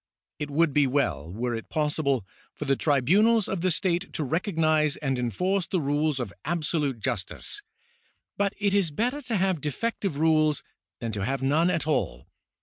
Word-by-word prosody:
It 150 -1 -3
would 150 +1 +2
be 145 -1 +4
well, 85 - 0
were 120 +5 -2
it 115 -1 -5
possible, 150 - 0 0.3
for 150 - -5
the 135 -1 +3
tribunals 190 - +3
of 195 -3 -2
the 185 - +2
state 180 +2 0
to 155 - -2
recog 165 +6 -2
nise 155 -2 +3
and 135 -3 -1
enforce 180 - 0
the 185 - 0
rules 145 0 0
of 120 -6 -4
absolute 155 -6 -1
justice; 120 - -3 0.7
but 200 -1 0
it 200 -1 +1
is 200 -5 +3
better 245 - -1
to 235 -5 -3
have 190 -5 +1
defective 190 - -2
rules 155 -1 +3 0.4
than 115 -1 -2
to 100 -2 -3
have 135 +4 -1
none 155 +6 +3
at 170 -4 0
all. - - -1
155 Hz, 175 wpm, -27 LUFS, 135-180 Hz, 0.7 s, be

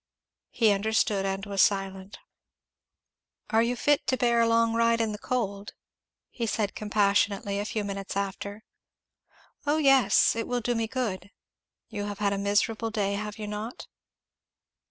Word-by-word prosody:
He 225 -3 +3
understood 200 -1 +1
and 195 +1 -3
was 200 -2 0
silent. 195 -1 0 1.3
"Are 225 0 +4
you 235 +2 0
fit 290 +4 +1
to 260 - +1
bear 235 -1 +3
a 230 - +3
long 230 0 +3
ride 230 0 +2
in 225 -1 0
the 210 - -6
cold?" 205 -5 -3 0.6
he 235 -2 -3
said 210 -2 -1
compassionately 200 -1 +1
a 205 - -2
few 215 0 -2
minutes 195 -1 -5
after. 200 +1 -4 1.0
"Oh 295 +2 +3
yes! 270 -10 +4
It 230 - -3
will 245 0 -1
do 240 +2 0
me 225 -1 -1
good." 215 -6 -3 0.6
"You 205 -2 -4
have 205 -1 -5
had 200 -1 0
a 200 - -2
miserable 210 +3 0
day, 205 -2 -1
have 210 0 -4
you 215 - -5
not?" 210 +3 -6
210 Hz, 155 wpm, -27 LUFS, 200-230 Hz, 1.3 s, Are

